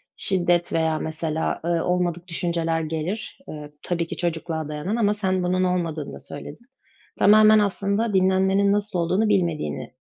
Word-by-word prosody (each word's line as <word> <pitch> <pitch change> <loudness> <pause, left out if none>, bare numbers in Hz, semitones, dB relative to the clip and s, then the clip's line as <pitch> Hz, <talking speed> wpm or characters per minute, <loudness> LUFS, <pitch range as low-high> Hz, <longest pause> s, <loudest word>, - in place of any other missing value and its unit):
şiddet 175 -3 +1
veya 160 -1 +1
mesela, 160 0 -3
eee, - - -1
olmadık 175 0 -1
düşünceler 170 -2 -1
gelir, 160 - -4
eee, 150 -1 -8
tabii 170 -2 -2
ki - - -5
çocukluğa 165 -2 -2
dayanan 150 +8 -3
ama 210 -3 +2
sen 190 -3 -1
bunun 185 +1 +1
olmadığını 170 -5 -2
da - - -9
söyledin. 235 +11 -8 0.5
Tamamen 215 +1 +6
aslında 205 +2 0
dinlenmenin 190 +1 +3
nasıl 205 -2 +2
olduğunu 185 +6 +1
bilmediğini, 170 - -1
175 Hz, 145 wpm, -23 LUFS, 165-200 Hz, 0.5 s, Tamamen